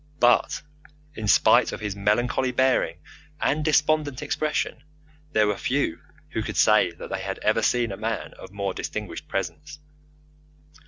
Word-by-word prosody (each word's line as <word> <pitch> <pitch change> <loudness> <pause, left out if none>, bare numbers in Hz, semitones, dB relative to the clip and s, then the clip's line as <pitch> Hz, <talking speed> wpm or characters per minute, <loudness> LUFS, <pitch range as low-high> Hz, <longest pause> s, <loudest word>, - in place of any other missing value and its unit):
But 120 -1 +3 0.5
in 110 -6 -5
spite - - +5
of - - -6
his 105 -2 -4
melancholy 120 +6 +1
bearing 125 -10 +2 0.4
and 150 +2 +1
despondent 150 -2 +1
expression, 150 -2 -1 0.5
there 110 -5 +3
were 105 0 +1
few 130 -7 -1 0.3
who - - -2
could - - -5
say 105 -4 +5
that 85 - -10
they 95 -1 -2
had 95 0 -4
ever 110 +1 +2
seen 120 0 +1
a 95 - -5
man 110 0 -3
of 95 - -11
more 100 -1 -3
distinguished - - -5
presence. 150 - -4
115 Hz, 150 wpm, -25 LUFS, 100-140 Hz, 0.5 s, spite